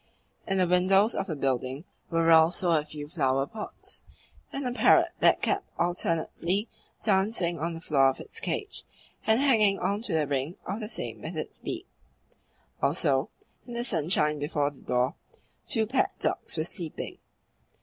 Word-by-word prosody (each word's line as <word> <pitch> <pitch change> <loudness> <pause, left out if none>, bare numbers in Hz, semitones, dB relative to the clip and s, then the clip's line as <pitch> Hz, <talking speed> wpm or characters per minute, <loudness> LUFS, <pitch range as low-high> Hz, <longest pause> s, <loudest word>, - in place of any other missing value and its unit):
In 195 - 0
the 185 - +4
windows 190 +5 +4
of 195 - -2
the 160 - -3
building 135 +1 -1 0.3
were 165 -1 +3
also 165 +2 +5
a 155 -2 +3
few 150 -1 -8
flower 135 -4 +1
pots 210 +8 -3 0.5
and 275 -1 -4
a 250 - 0
parrot 245 - +5
that - - +4
kept - - 0
alternately 175 +3 0 0.4
dancing 190 -4 +2
on 165 +2 -2
the 165 - -8
floor 135 -4 +4
of 135 - -4
its 455 - -4
cage 410 -2 -2 0.4
and 220 +1 +4
hanging 220 -8 +4
on 200 +3 -1
to 210 -6 -3
the 155 -2 +2
ring 140 +4 -2
of 195 +4 -3
the 215 -2 -5
same - - -5
with - - -6
its - - -5
beak. - - -5 1.0
Also, - - +2 0.4
in 240 - -7
the 235 0 -2
sunshine 155 - +1
before 145 -1 0
the 140 - -18
door 125 +1 +1 0.5
two 225 -4 +2
pet 255 +5 0
dogs - - -2
were 155 - +1
sleeping. 165 -1 -5
170 Hz, 165 wpm, -28 LUFS, 150-205 Hz, 1.0 s, also